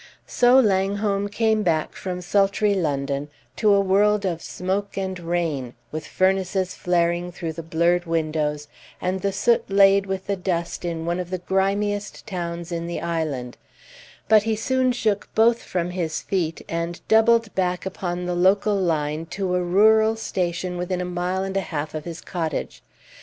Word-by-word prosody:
So 250 +1 +5
Langholm 200 -1 +1
came 220 +1 +1
back 160 -5 0
from 180 -1 -5
sultry 200 +2 +2
London 140 -5 -1 0.3
to 215 -2 +3
a 200 - +5
world 200 +1 +3
of 170 -3 -2
smoke 195 +3 -3
and 190 -1 -3
rain, 165 -8 -2 0.2
with 155 0 -5
furnaces 190 0 +1
flaring 175 0 0
through 165 -2 -5
the 165 - -6
blurred 170 +2 +1
windows, 155 -3 -1 0.3
and 185 +1 -2
the 200 - 0
soot 230 +3 +1
laid 195 0 +5
with 190 0 -3
the 200 - -1
dust 180 -2 -3
in 165 -1 -3
one 170 +1 -1
of 180 -1 -4
the 185 - -2
grimiest 200 +3 -1
towns 170 -4 -5
in 170 0 -3
the 170 - -3
island; 155 -7 -3 0.7
but 215 -1 +6
he 220 +1 0
soon 255 +3 +1
shook 215 -4 -1
both 230 +1 +4
from 175 -1 -2
his 170 -3 -3
feet, 170 -4 -2
and 170 +1 -4
doubled 225 0 +4
back 180 -1 -1
upon 180 -2 -3
the 180 - -1
local 195 +3 +3
line 160 -3 -1
to 185 +2 -2
a 180 0 +1
rural 220 +5 +4
station 180 -4 -2
within 180 +1 -2
a 180 - -2
mile 180 +1 -2
and 195 0 -4
a 195 - +2
half 150 -4 -4
of 155 -1 -5
his 170 -1 -7
cottage. 165 -5 -4
180 Hz, 170 wpm, -23 LUFS, 170-200 Hz, 0.7 s, but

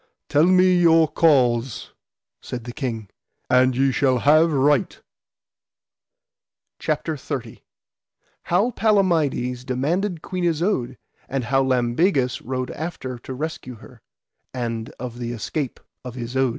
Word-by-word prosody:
Tell 150 +2 +4
me 185 0 +5
your 165 -2 +5
cause, 130 -7 +2 0.5
said 120 -2 -6
the 120 - -7
king, 115 -7 -4 0.4
and 125 0 +4
ye 135 0 +3
shall 130 -1 +2
have 155 +6 +4
right. 145 +5 +2 1.8
CHAPTER - - -2
XXX. - - -6 0.8
How 195 +7 +2
Palamides 165 - +1
demanded 160 +8 -1
Queen 185 -1 -4
Isoud, 160 - 0 0.3
and 135 -1 -2
how 135 +3 +2
Lambegus 130 +2 +1
rode 130 -3 -4
after 135 -6 -6
to 130 - -8
rescue 140 -3 -5
her, 110 - -16 0.5
and 115 -2 -3
of 120 -1 -6
the 120 0 -4
escape 130 +4 -4 0.2
of 125 -1 -8
Isoud. 130 +2 0
135 Hz, 120 wpm, -22 LUFS, 125-165 Hz, 1.8 s, me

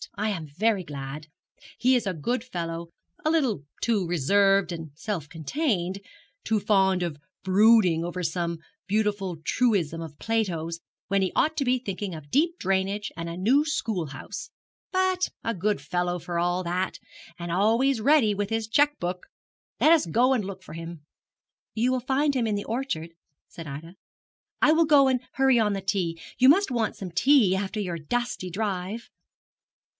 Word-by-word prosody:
I 215 +1 -1
am 165 -6 -4
very 200 +6 0
glad. 145 0 -7 0.5
He 255 +2 +3
is 240 -5 0
a 190 - 0
good 220 - -2
fellow, 170 -7 -5 0.3
a 310 - +2
little 260 - +1 0.2
too 215 -5 +1
reserved 195 +4 +3
and 165 -2 -6
self 170 -4 -4
contained, 185 - -1 0.4
too 220 -1 +1
fond 190 -3 +2
of 160 -4 -4 0.2
brooding 190 -3 +5
over 175 +1 -4
some 170 0 -2 0.3
beautiful 205 -3 0
truism 180 -11 +1
of 155 -3 -8
Plato's 170 -7 -1 0.3
when 200 -1 +1
he 185 - 0
ought 315 +1 +2
to 275 - 0
be 255 +1 +3
thinking 200 -6 -5
of 145 -2 -11
deep 335 +4 +2
drainage 195 - -1
and 170 0 -5
a 170 - -6
new 250 +11 +3
school 225 - -2
house; 135 - -7 0.4
but 370 -1 +1
a 230 - -1
good 205 0 0
fellow 175 +4 -1
for 175 0 -3
all 175 +1 0
that, 180 +2 -2 0.4
and 170 -1 -5
always 225 +7 +2
ready 270 -5 +4
with 200 0 -2
his 225 -1 -1
cheque 290 +6 +2
book. 180 +1 -4 0.5
Let 310 - +5
us 325 - +4
go 245 +10 +3
and 240 -5 0
look 190 -1 -7
for 155 - -11
him.' 165 -2 -8 0.7
'You 240 +3 +2
will 255 - +1
find 275 +3 +1
him 240 -3 +1
in 210 - 0
the 205 - -3
orchard,' 225 -10 -3 0.3
said 165 -2 -10
Ida. 155 +6 -8 0.7
'I 305 - +7
will 330 +1 +4
go 290 -3 +6
and 255 -2 +1
hurry 265 -2 +4
on 210 -2 +2
the 195 - -3
tea. 185 -4 -1 0.2
You 255 +1 +7
must 380 +2 +4
want 230 -3 0
some 185 -3 -7
tea 220 - +4
after 200 +2 -3
your 175 -4 -3
dusty 240 +2 -2
drive.' 200 +2 -3
195 Hz, 175 wpm, -26 LUFS, 170-240 Hz, 0.7 s, I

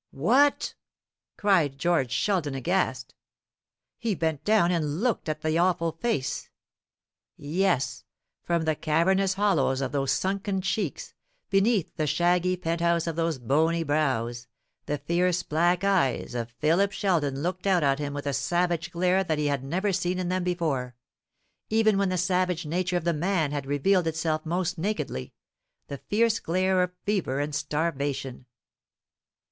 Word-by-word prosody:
"WHAT!" 255 - +2 0.6
cried 175 -9 +2
George 165 -5 +1
Sheldon, 150 -1 0
aghast. 175 +8 -1 0.9
He 225 -4 -1
bent 160 -4 -2
down 210 -5 +3
and 160 -1 -1
looked 235 -9 0
at 155 0 -3
the 155 +1 +1
awful 170 -2 +2
face. 160 - -2 0.9
Yes, 165 0 0 0.4
from 170 -1 0
the 160 0 +1
cavernous 185 +6 +2
hollows 165 -10 +2
of 135 -1 -2
those 135 -2 0
sunken 195 0 -1
cheeks, 190 +4 -3 0.4
beneath 195 -1 +2
the 155 - 0
shaggy 180 +3 +2
penthouse 170 0 0
of 165 -2 -3
those 165 -2 0
bony 160 +7 +1
brows, 130 -6 -1 0.4
the 150 - -1
fierce 180 +3 0
black 175 +4 +1
eyes 185 -12 +1
of 120 -1 -3
Philip 165 +10 +1
Sheldon 160 -9 0
looked 185 +2 -2
out 180 -4 +3
at 135 0 +2
him 145 -1 -3
with 145 - -5
a 140 - -1
savage 175 +6 0
glare 180 +2 +1
that 160 -4 -1
he 150 - -1
had 140 -2 0
never 185 +8 -1
seen 180 0 -1
in 180 -1 -2
them 185 0 0
before 155 -9 -2 0.7
even 215 -2 +3
when 200 -1 +1
the 185 - -1
savage 180 -1 0
nature 180 +3 -1
of 175 - -3
the 170 0 +1
man 165 -2 0
had 145 -2 -4
revealed 165 +6 +2
itself 160 0 -1
most 180 +1 -1
nakedly 160 - -3 0.5
the 140 - -6
fierce 225 +1 +1
glare 185 +2 +1
of 180 0 0
fever 185 -10 0
and 145 +1 -2
starvation. 140 -4 -2
170 Hz, 150 wpm, -26 LUFS, 145-185 Hz, 0.9 s, down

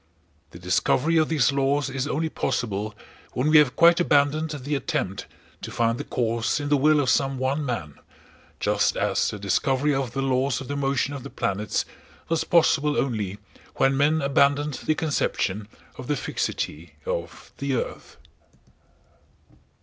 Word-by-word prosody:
The - - -12
discovery 125 - +1
of 155 -1 +3
these 150 -5 +3
laws 140 0 +1
is 135 0 -3
only 160 +2 -1
possible 105 -8 -2 0.4
when 135 +5 +1
we 155 - +8
have 140 -4 +3
quite 170 +1 +6
abandoned 150 -1 +2
the 145 -1 -4
attempt 135 - -2 0.3
to - - -6
find 115 0 0
the - - -3
cause 115 +1 -1
in 145 0 -3
the 145 - +4
will 150 +2 +4
of 140 - 0
some 135 0 +2
one 135 +3 -1
man, 110 - -4 0.6
just - - +1
as - - +1
the 105 - -5
discovery 130 +9 +1
of 135 -3 -2
the 135 - -1
laws 130 0 +1
of 135 - -8
the 145 - -2
motion 140 0 0
of 140 - -6
the - - -8
planets 105 -3 -2 0.4
was 165 -1 +1
possible 150 -3 +3
only 105 -7 -1 0.4
when 135 0 +2
men 150 +2 +2
abandoned 140 +1 +2
the 155 - +3
conception 110 -10 -1 0.3
of 130 - -7
the 150 - +1
fixity 80 - -4
of 85 0 -5
the 140 -1 -1
earth. - - -5
135 Hz, 160 wpm, -25 LUFS, 115-145 Hz, 0.6 s, we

